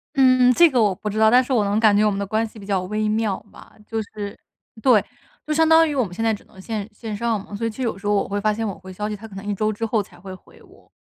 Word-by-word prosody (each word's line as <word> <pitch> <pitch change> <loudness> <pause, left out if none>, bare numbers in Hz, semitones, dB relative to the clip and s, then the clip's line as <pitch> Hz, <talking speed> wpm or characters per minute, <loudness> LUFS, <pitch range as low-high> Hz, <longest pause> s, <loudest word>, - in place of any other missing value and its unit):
嗯， 255 -2 +5
这 340 +6 +6
个 255 -5 +2
我 205 -3 +3
不 210 +3 -5
知 210 - -5
道， 220 0 +5
但 250 +2 +6
是 255 - -8
我 235 -5 +3
能 200 +2 +1
感 215 -2 +5
觉 210 +1 +4
我 210 - +3
们 195 - -3
的 200 - -2
关 220 +3 0
系 215 - -14
比 200 - -11
较 195 -3 0
微 215 +3 -1
妙 215 -3 -1
嘛。 - - -16
就 225 - -3
是， 205 -1 -8 0.4
对， 230 -6 +5 0.4
就 - - -3
相 320 +1 +3
当 325 0 +6
于 295 - -3
我 260 - +2
们 180 - -9
现 225 - -4
在 225 - +3
只 210 - -5
能 190 - -16
线 210 -1 -4
线 215 0 -6
上 225 -3 -1
嘛， 205 - -9
所 230 - -3
以 - - 0
其 215 - -11
实 260 - -3
有 230 - 0
的 195 - -14
时 200 - -14
候 205 - +2
我 200 - +1
会 200 0 -2
发 215 +1 +1
现 225 +1 -3
我 195 - -5
回 190 0 -11
消 210 +3 -4
息， 210 - -3
他 220 +2 -10
可 200 - -13
能 195 - -7
一 205 0 -2
周 215 +2 0
之 225 +2 -3
后 220 -2 0
才 190 - -19
会 190 +1 -9
回 - - -20
我。 - - -21
215 Hz, 365 characters per minute, -22 LUFS, 200-230 Hz, 0.4 s, 这